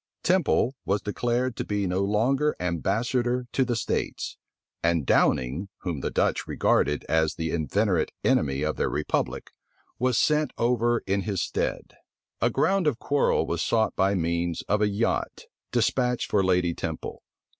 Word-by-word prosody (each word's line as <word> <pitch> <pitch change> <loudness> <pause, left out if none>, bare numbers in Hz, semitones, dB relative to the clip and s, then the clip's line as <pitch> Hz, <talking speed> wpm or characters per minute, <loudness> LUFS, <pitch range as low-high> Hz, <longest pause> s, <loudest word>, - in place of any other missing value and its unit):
Temple 180 -8 +2
was 100 +1 0
declared 120 +3 -1
to - - -1
be 105 -1 -1
no 90 +1 0
longer 120 +9 +1
ambassador 120 +8 0
to 135 - +2
the 120 -2 -1
states, 115 - -2 0.5
and 85 -3 +1
Downing, 70 +13 +2
whom 85 -5 -3
the - - -2
Dutch - - 0
regarded 75 0 +1
as 80 -1 +1
the 80 -1 -3
inveterate 90 +3 0
enemy 70 -1 +2
of 75 0 -1
their - - 0
republic, - - -2 0.5
was 125 -1 +2
sent 150 +2 +2
over 120 0 +1
in 100 +1 0
his 100 -3 -2
stead. - - -3 0.5
A - - +3
ground 195 -3 +1
of 140 -6 +1
quarrel 145 +3 +1
was - - -2
sought 110 -1 +1
by 95 +1 +2
means 85 -1 -1
of 105 +1 0
a 105 - +3
yacht, 105 +3 -1 0.3
despatched 125 -2 +1
for 100 -2 +3
Lady 90 -2 +2
Temple. 80 -1 -5
105 Hz, 155 wpm, -26 LUFS, 85-125 Hz, 0.5 s, A